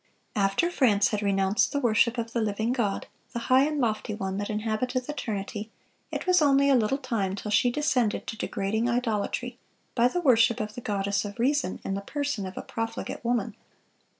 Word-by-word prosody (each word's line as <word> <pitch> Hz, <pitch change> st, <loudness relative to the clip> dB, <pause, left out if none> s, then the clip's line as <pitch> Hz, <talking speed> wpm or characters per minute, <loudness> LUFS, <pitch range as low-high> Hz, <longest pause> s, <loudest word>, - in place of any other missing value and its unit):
(403) 205 Hz, -, +1 dB
After 195 Hz, -, +2 dB
France 210 Hz, -7 st, +4 dB
had 210 Hz, -1 st, -1 dB
renounced 195 Hz, 0 st, +2 dB
the 285 Hz, -, 0 dB
worship 235 Hz, -1 st, +3 dB
of 230 Hz, 0 st, -3 dB
the 235 Hz, -, +1 dB
living 220 Hz, +2 st, 0 dB
God, 215 Hz, -6 st, -1 dB, 0.3 s
"the -, -, -3 dB, 0.2 s
high 265 Hz, +2 st, +6 dB
and 305 Hz, -1 st, -2 dB
lofty 220 Hz, -3 st, -1 dB
One 190 Hz, -2 st, -3 dB
that 205 Hz, -, -3 dB
inhabiteth 225 Hz, +4 st, -1 dB
eternity," 215 Hz, -6 st, -4 dB, 0.4 s
it -, -, -3 dB
was 365 Hz, -2 st, +4 dB
only 280 Hz, -1 st, +4 dB
a -, -, +6 dB
little 240 Hz, +2 st, +2 dB
time 225 Hz, -8 st, -2 dB
till 210 Hz, +1 st, -5 dB
she 245 Hz, +4 st, +4 dB
descended 250 Hz, -5 st, 0 dB
to -, -, -5 dB
degrading 220 Hz, +3 st, -1 dB
idolatry, 240 Hz, +1 st, -1 dB, 0.3 s
by 240 Hz, 0 st, +4 dB
the 355 Hz, -, -1 dB
worship 235 Hz, -5 st, +4 dB
of 215 Hz, 0 st, -3 dB
the 245 Hz, -, -7 dB
Goddess 200 Hz, -2 st, -1 dB
of 205 Hz, -1 st, -7 dB
Reason, 265 Hz, -4 st, +1 dB
in 195 Hz, -, -1 dB
the 195 Hz, -, -2 dB
person 285 Hz, -3 st, -3 dB
of 185 Hz, -, -9 dB
a -, -, -4 dB
profligate 225 Hz, +1 st, -4 dB
woman. 235 Hz, -3 st, 0 dB
225 Hz, 195 wpm, -27 LUFS, 205-255 Hz, 0.4 s, high